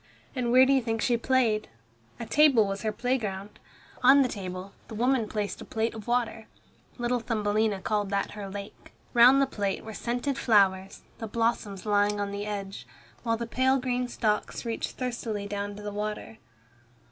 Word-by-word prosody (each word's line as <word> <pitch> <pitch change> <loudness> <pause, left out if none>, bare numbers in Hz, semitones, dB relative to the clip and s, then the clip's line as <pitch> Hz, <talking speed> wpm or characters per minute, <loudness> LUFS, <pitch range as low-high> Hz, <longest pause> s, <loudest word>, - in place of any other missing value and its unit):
And 245 -2 0
where 255 +1 +7
do 275 - +3
you 265 - +3
think 225 -1 -2
she 240 +2 +2
played? 235 -3 +1 0.5
A 235 - -4
table 270 -2 +5
was 195 0 -3
her 220 - -1
playground. 210 -4 -3 0.4
On 270 +2 +7
the - - +1
table 185 -3 -6
the 220 - -8
woman 240 -1 +1
placed 210 -2 -3
a - - -6
plate 225 +1 -1
of 220 -1 -9
water. 235 -2 -1 0.5
Little 245 0 0
Thumbelina 215 -3 0
called 205 0 -1
that 200 0 -1
her 205 -2 -7
lake. 200 +1 -9 0.2
Round 245 +3 +7
the 275 - +4
plate 200 -7 -3
were 220 - -8
scented 245 +5 -2
flowers, 195 -4 +2 0.2
the 225 - -4
blossoms 220 -3 -1
lying 205 0 +2
on 200 0 -2
the 200 +1 -4
edge, 200 -2 -5 0.3
while 230 -2 0
the 235 - -3
pale 260 +3 +2
green 250 -1 -1
stalks 215 -1 -1
reached 230 -1 -3
thirstily 235 -5 -3
down 205 0 -4
to 210 - -10
the 205 - -4
water. 210 +1 -5
220 Hz, 180 wpm, -28 LUFS, 205-245 Hz, 0.5 s, where